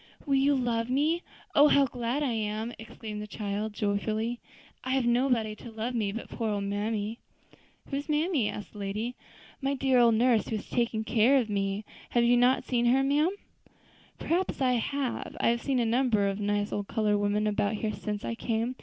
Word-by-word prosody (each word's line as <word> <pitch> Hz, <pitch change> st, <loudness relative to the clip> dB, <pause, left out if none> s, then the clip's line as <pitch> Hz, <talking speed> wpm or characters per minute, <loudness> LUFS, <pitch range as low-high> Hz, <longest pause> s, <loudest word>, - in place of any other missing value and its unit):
"Will 280 Hz, -, 0 dB
you 275 Hz, +1 st, +4 dB
love 235 Hz, -2 st, 0 dB
me? 300 Hz, +6 st, +1 dB, 0.3 s
Oh! 290 Hz, +1 st, +7 dB
how 280 Hz, -1 st, +5 dB
glad 245 Hz, +3 st, -2 dB
I 270 Hz, -, 0 dB
am," 220 Hz, +1 st, -2 dB
exclaimed 220 Hz, -1 st, -7 dB
the 210 Hz, -, -6 dB
child 210 Hz, 0 st, -3 dB
joyfully; 215 Hz, +3 st, -1 dB, 0.4 s
"I 260 Hz, -, -1 dB
have 265 Hz, -2 st, +1 dB
nobody 240 Hz, -3 st, +2 dB
to 235 Hz, -, -10 dB
love 225 Hz, +2 st, -4 dB
me 215 Hz, -4 st, 0 dB
but 230 Hz, +3 st, -6 dB
poor 225 Hz, -2 st, -3 dB
old 205 Hz, -1 st, -1 dB
mammy." 210 Hz, +2 st, -2 dB, 0.3 s
"And -, -, -24 dB, 0.3 s
who 275 Hz, -, 0 dB
is 285 Hz, -, -9 dB
mammy?" 300 Hz, -, +1 dB
asked 210 Hz, -, -7 dB
the 210 Hz, -, -10 dB
lady. 210 Hz, +5 st, -3 dB, 0.5 s
"My 275 Hz, +1 st, 0 dB
dear 265 Hz, -1 st, +3 dB
old 235 Hz, -2 st, +5 dB
nurse, 235 Hz, -1 st, +3 dB
who 225 Hz, -, -2 dB
has 210 Hz, -, -5 dB
always -, -, -20 dB
taken 235 Hz, -3 st, 0 dB
care 235 Hz, +4 st, +4 dB
of 230 Hz, -5 st, 0 dB
me. 200 Hz, +1 st, -1 dB, 0.2 s
Have 240 Hz, -, +2 dB
you 240 Hz, +1 st, +5 dB
not 245 Hz, +2 st, +4 dB
seen 240 Hz, -1 st, +1 dB
her, 265 Hz, +3 st, +4 dB
ma'am?" 290 Hz, +4 st, +3 dB, 0.9 s
"Perhaps 360 Hz, +3 st, -1 dB
I 255 Hz, -2 st, +3 dB
may. 280 Hz, -3 st, -3 dB
I -, -, +5 dB
have 235 Hz, 0 st, +1 dB
seen 275 Hz, -2 st, 0 dB
a 240 Hz, -, +2 dB
number 230 Hz, -3 st, +2 dB
of 195 Hz, +1 st, -2 dB
nice 205 Hz, 0 st, 0 dB
old 205 Hz, -1 st, -2 dB
colored 210 Hz, -2 st, +1 dB
women 205 Hz, +1 st, +1 dB
about 210 Hz, 0 st, 0 dB
here 215 Hz, 0 st, -2 dB
since 210 Hz, -1 st, -4 dB
I -, -, -2 dB
came. 230 Hz, +2 st, -2 dB
230 Hz, 205 wpm, -28 LUFS, 210-255 Hz, 0.9 s, Oh